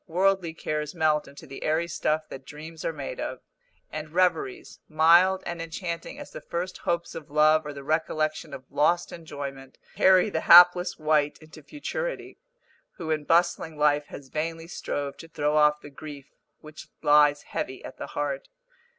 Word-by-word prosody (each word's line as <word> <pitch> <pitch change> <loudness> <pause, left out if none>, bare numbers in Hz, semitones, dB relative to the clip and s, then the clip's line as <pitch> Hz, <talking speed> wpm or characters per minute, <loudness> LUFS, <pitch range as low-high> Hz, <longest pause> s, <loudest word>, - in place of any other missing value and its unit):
Worldly 185 -1 +1
cares 150 -1 -3
melt 155 -2 +1
into 140 +3 -13
the 135 -2 -10
airy 160 +2 0
stuff 155 -1 -1
that 135 - -9
dreams 155 +3 -10
are - - -1
made 145 -4 -6
of, - - -4 0.5
and 155 0 -6
reveries, 350 - 0
mild 170 +4 +5
and 170 -1 -4
enchanting 170 - -5
as 290 - -10
the - - -8
first 180 +2 -4
hopes 170 0 -2
of 155 - -9
love 155 +1 +4
or 145 - -5
the 140 -1 -9
recollection 155 0 -1
of 130 - -9
lost 155 +5 +2
enjoyment, 140 -5 -8 0.2
carry 190 +2 +5
the 160 - -1
hapless 180 +1 +7
wight 150 -2 +1
into 155 0 -14
futurity, - - -5 0.5
who 160 -2 -5
in 155 -1 -1
bustling 165 -1 +1
life 150 0 +2
has 135 -2 -11
vainly 165 +2 -4
strove 140 -4 -4
to 165 - -11
throw 150 -2 -1
off 150 0 +4
the 145 - -11
grief 145 -1 -10 0.3
which 155 0 -12 0.2
lies 150 -1 +5
heavy - - -5
at - - -10
the - - -6
heart. - - -4
155 Hz, 170 wpm, -26 LUFS, 150-170 Hz, 0.5 s, hapless